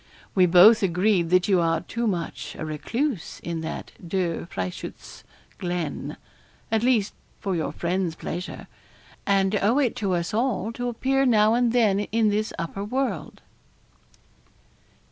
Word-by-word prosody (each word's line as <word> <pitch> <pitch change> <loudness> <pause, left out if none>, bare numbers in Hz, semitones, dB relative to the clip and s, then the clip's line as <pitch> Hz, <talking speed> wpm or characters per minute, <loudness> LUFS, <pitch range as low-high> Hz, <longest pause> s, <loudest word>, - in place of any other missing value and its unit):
We 185 -2 +5
both 185 +6 +7
agreed 180 -1 +2
that 185 0 +3
you 190 -3 +4
are 165 -1 +1
too 235 0 -3
much 175 -5 -3
a - - -4
recluse 220 - -3
in 170 -1 -4
that 160 - -6
Der 170 -2 -2
Frieschutz 95 - -6 0.4
Glen 175 -4 -3 0.5
at 220 -1 +2
least, 235 -5 +2 0.3
for 195 -2 -2
your 160 - -1
friends' 175 -1 -1
pleasure; 175 +3 -6 0.6
and 195 0 +3
owe 225 +6 +3
it 260 -5 +2
to 195 -6 0
us 170 +4 -2
all 225 -3 0
to 245 +1 -3
appear 270 +3 +1
now 215 -2 +4
and 240 0 +2
then 220 -5 +3
in 215 +1 +1
this 215 +1 0
upper 170 +4 -4
world.' 235 - -3
195 Hz, 145 wpm, -25 LUFS, 175-230 Hz, 0.6 s, both